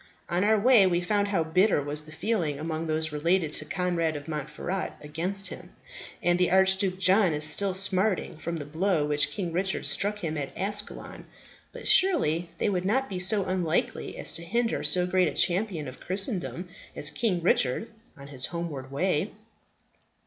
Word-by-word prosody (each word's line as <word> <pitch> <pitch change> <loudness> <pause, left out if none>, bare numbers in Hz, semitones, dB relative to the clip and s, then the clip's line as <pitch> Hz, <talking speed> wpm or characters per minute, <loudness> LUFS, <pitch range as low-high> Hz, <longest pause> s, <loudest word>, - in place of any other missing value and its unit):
On 175 +2 +1
our 215 +1 +3
way, 225 -3 +6
we 175 -1 +1
found 205 +2 0
how 195 -5 +1
bitter 180 +4 +2
was 145 +1 -2
the 155 +1 -14
feeling 170 -6 -1
among 160 +2 -4
those 160 0 0
related 165 +2 0
to - - +2
Conrad 175 -3 -1
of 145 +1 -7
Montferat 155 +5 -4
against 180 +6 -2
him; - - -11 0.5
and 175 0 +2
the 180 - +3
Archduke 190 0 +2
John 190 -1 +4
is 150 0 -1
still 185 +5 +4
smarting 190 -3 0
from 170 +1 -4
the 145 - -6
blow 160 +1 0
which 150 0 +2
King 180 -5 -4
Richard 190 +2 -1
struck 205 0 -1
him 155 -2 -2
at 140 - -6
Ascalon. 205 +2 -4 0.5
But - - -8
surely 175 - +3
they - - 0
would 185 -3 0
not 260 +8 0
be 185 -2 -4
so 195 +2 +2
unknightly 180 -3 -1
as - - +1
to 165 - 0
hinder 230 +6 -1
so 180 -1 +2
great 180 0 +2
a - - -3
champion 180 -4 +1
of 130 - -9
Christendom 185 -2 -2 0.3
as 150 - +1
King 210 -7 0
Richard 140 - +1 0.3
on 140 - -11
his 130 -2 0
homeward 155 -6 -6
way?" 180 +5 0
180 Hz, 180 wpm, -27 LUFS, 155-195 Hz, 0.5 s, way